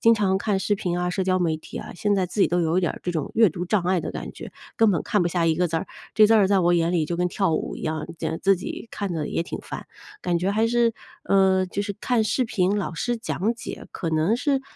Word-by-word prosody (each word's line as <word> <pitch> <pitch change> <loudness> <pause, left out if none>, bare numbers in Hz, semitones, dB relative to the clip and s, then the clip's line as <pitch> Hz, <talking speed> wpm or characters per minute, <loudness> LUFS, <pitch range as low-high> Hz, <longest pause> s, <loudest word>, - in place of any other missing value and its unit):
经 230 0 +6
常 190 -3 +1
看 200 -1 0
视 205 +2 +1
频 180 -4 -2
啊、 180 0 0
社 190 - -1
交 185 0 +2
媒 165 -3 0
体 - - -10
啊， - - -6
现 205 +3 +1
在 190 - +1
自 180 +4 -4
己 - - +6
都 175 +1 +1
有 165 +3 +2
一 - - +3
点 175 - 0
儿 - - -10
这 175 - -2
种 155 -3 -3
阅 220 -4 +5
读 175 +3 -4
障 195 +1 +1
碍 180 0 +1
的 - - -4
感 - - -6
觉， - - -10 0.2
根 225 -2 +5
本 175 -6 0
看 210 - +1
不 175 - +1
下 170 -1 0
一 160 - +3
个 180 +2 +1
字 165 - -1
儿， 175 - -2 0.3
这 215 -1 +7
字 225 - +3
儿 210 -3 +5
在 200 -1 +4
我 175 0 +3
眼 170 0 +2
里 165 -3 +2
就 170 - -3
跟 180 +1 +1
跳 190 -1 0
舞 - - -2
一 - - -9
样， 155 -1 -2
呃 160 - -2
自 195 0 +3
己 185 - -6
看 200 -3 -3
着 155 -3 -2
也 - - -1
挺 170 - -6
烦。 - - -7 0.4
感 175 -1 +1
觉 185 +3 0
还 220 +3 +2
是， 235 0 +2 0.3
呃， 190 -1 +3
就 190 +2 -3
是 205 0 -3
看 245 -3 +2
视 250 +4 +1
频 200 -3 +1
老 185 -4 -3
师 240 +8 -1
讲 190 - -1
解， 230 - -8
可 170 - -4
能 160 +8 +2
是 275 +1 +1
185 Hz, 310 characters per minute, -24 LUFS, 170-210 Hz, 0.4 s, 这